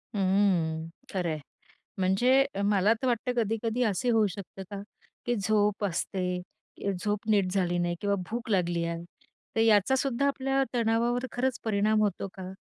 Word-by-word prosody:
हम्म. 185 -5 +2 0.3
खरंय. 170 -5 -1 0.6
म्हणजे 245 +9 +4 0.2
मला 205 +1 +4
तर 260 - 0
वाटतं 245 0 0
कधी-कधी 225 +3 -1
असे 230 +3 0
होऊ 220 -3 +4
शकतं 195 0 -8
का? 200 0 -5 0.4
की 240 0 +1
झोप 205 0 +1
असते, 180 0 -2 0.5
झोप 205 +3 -3
नीट 200 -3 +3
झाली 175 -3 +1
नाही 175 0 0
किंवा 200 0 +1
भूक 235 +1 -4
लागली 175 -4 +1
आहे, 170 0 -4 0.5
तर 225 - +1
याचासुद्धा 245 +5 +3
आपल्या 270 0 +1
तणावावर 235 +2 +1
खरंच 255 0 0
परिणाम 215 0 +2
होतो 200 -2 0
का? 185 0 -7
205 Hz, 140 wpm, -28 LUFS, 185-235 Hz, 0.6 s, म्हणजे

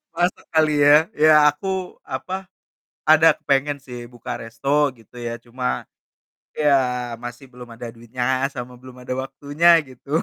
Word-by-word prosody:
masak 175 +2 -1
kali 155 -1 +4
ya, 150 +3 +6
ya 155 +1 +5 0.2
aku, 150 +7 -6 0.4
apa, 130 +7 -5 0.8
ada 160 0 +7
kepengen, 140 +1 0
sih 120 -2 -8
buka 120 - -10
resto 115 +4 -8 0.3
gitu, 115 +2 -22
ya, 115 - -3
cuma, 115 - -3 0.7
ya 150 -1 +3 0.5
masih 120 +3 -8
belum 125 -1 -12
ada 120 +1 -8
duitnya 120 +2 -5 0.3
sama 125 0 -7
belum 130 -1 -12
ada 125 - -4
waktunya 145 +5 -1 0.2
gitu, 130 +2 -17
130 Hz, 140 wpm, -22 LUFS, 120-150 Hz, 0.8 s, ada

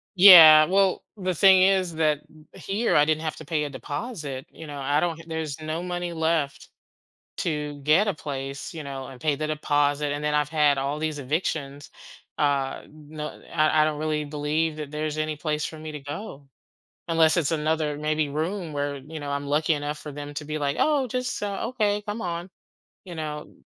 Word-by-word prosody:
Yeah, 165 -5 +10
well, 190 +1 +2
the 185 -2 -2
thing 190 +2 +6
is 185 -3 +2
that 155 -2 +2
m 155 0 -19
here 210 +4 -1
I 150 - +6
didn't 155 0 +1
have 155 -1 -4
to 160 - -10
pay 150 0 -1
a 145 - -3
deposit. 145 - -6
You 160 - -11
know, 145 -1 -7
I 145 +2 +1
don't 165 -1 -1
h - - -12
there's 160 -2 -4
no 155 +2 -3
money 175 -1 -3
left 160 -3 -1 0.7
to 150 -3 -3
get 160 +9 +4
a 205 - 0
place, 140 -2 -6
you 160 -3 -7
know, 135 -1 -6
and 130 -2 -12
pay 150 -2 +1
the 155 +2 -3
deposit, 145 -1 0
and 145 - -4
then 150 0 0
I've 150 -1 +1
had 150 -3 +3
all 140 +2 -2
these 155 -2 -2
evictions. 145 0 -3 0.5
Uh, 140 -2 0
no, 150 0 -9
I 155 -1 +3
I - - +5
don't 155 -1 -1
really 155 -1 -1
believe 150 +2 -1
that 150 -1 -7
there's 155 0 -3
any 155 0 -1
place 150 -1 -2
for 160 - -6
me 155 0 -7
to 150 - -7
go, 145 -1 -8 0.6
unless 165 -1 +3
it's 165 -2 +1
another, 155 -1 0
maybe, 155 -1 -1
room 165 +3 -3
where, 145 0 -2
you 150 +3 -9
know, 145 -1 -5
I'm 140 0 -2
lucky 155 +2 +2
enough 145 +1 -4
for 150 - -8
them 145 0 -7
to 150 - -5
be 155 0 -3
like, 145 -1 -1
"Oh, 290 -4 +2
just, 250 0 -3
uh, 205 +1 -2
okay, 210 -5 0
come 210 +2 -5
on." 175 +1 -4 0.6
You 175 -3 -9
know? 150 -1 -6
155 Hz, 205 wpm, -25 LUFS, 145-165 Hz, 0.7 s, Yeah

